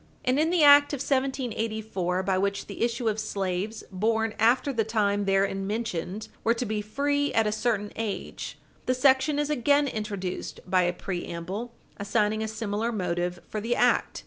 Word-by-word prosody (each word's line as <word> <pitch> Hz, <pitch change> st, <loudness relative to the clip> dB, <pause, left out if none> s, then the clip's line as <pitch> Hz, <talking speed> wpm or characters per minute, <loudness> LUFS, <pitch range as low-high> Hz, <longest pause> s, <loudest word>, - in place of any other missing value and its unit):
And 255 Hz, +3 st, +2 dB
in 315 Hz, +1 st, +3 dB
the 345 Hz, -3 st, +3 dB
act 285 Hz, 0 st, +8 dB
of -, -, 0 dB
1784, 220 Hz, -9 st, -1 dB
by 190 Hz, 0 st, +1 dB
which 200 Hz, +1 st, -1 dB
the 200 Hz, -, -8 dB
issue 235 Hz, 0 st, 0 dB
of 215 Hz, 0 st, 0 dB
slaves 200 Hz, 0 st, -3 dB
born 220 Hz, +3 st, 0 dB
after 250 Hz, +5 st, +3 dB
the 225 Hz, -2 st, +1 dB
time 205 Hz, -2 st, +1 dB
therein 195 Hz, 0 st, +1 dB
mentioned 210 Hz, -2 st, -3 dB, 0.2 s
were 230 Hz, +1 st, +3 dB
to 245 Hz, -, -2 dB
be 215 Hz, -1 st, -2 dB
free 285 Hz, +7 st, 0 dB
at 225 Hz, -, +4 dB
a 210 Hz, -, +1 dB
certain 215 Hz, -2 st, -1 dB
age, 220 Hz, -3 st, -4 dB, 0.3 s
the 255 Hz, -, +2 dB
section 265 Hz, +3 st, +3 dB
is 295 Hz, 0 st, 0 dB
again 285 Hz, +1 st, +3 dB
introduced 205 Hz, -6 st, -4 dB
by 185 Hz, 0 st, +3 dB
a 175 Hz, 0 st, +2 dB
preamble 185 Hz, +5 st, -5 dB, 0.2 s
assigning 210 Hz, +1 st, 0 dB
a 220 Hz, -, -1 dB
similar 220 Hz, +1 st, -2 dB
motive 180 Hz, -3 st, -2 dB
for 215 Hz, -, -4 dB
the 235 Hz, +3 st, 0 dB
act. 245 Hz, 0 st, +2 dB
220 Hz, 170 wpm, -27 LUFS, 195-245 Hz, 0.3 s, act